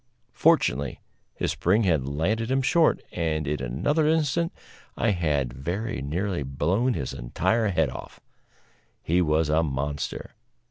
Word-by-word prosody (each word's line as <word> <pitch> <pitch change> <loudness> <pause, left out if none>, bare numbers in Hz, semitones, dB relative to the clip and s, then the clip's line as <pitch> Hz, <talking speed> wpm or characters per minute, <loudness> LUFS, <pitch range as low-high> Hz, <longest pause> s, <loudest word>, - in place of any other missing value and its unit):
Fortunately, 65 0 +2 0.4
his - - -1
spring 100 +6 +2
had 80 -9 +1
landed 100 - -1
him 135 0 +1
short, 165 +4 +3
and 80 -3 -1
in 75 -1 -1
another 95 - +1
instant 160 +2 +1 0.5
I 115 - +2
had 75 -9 0
very 95 - -3
nearly 85 +5 -2
blown 85 - 0
his 65 - -3
entire 110 - 0
head 80 -6 +1
off. - - -9 0.8
He 90 +3 +2
was 80 -1 +2
a 80 +2 +3
monster. 70 -1 -3
85 Hz, 135 wpm, -26 LUFS, 70-110 Hz, 0.8 s, short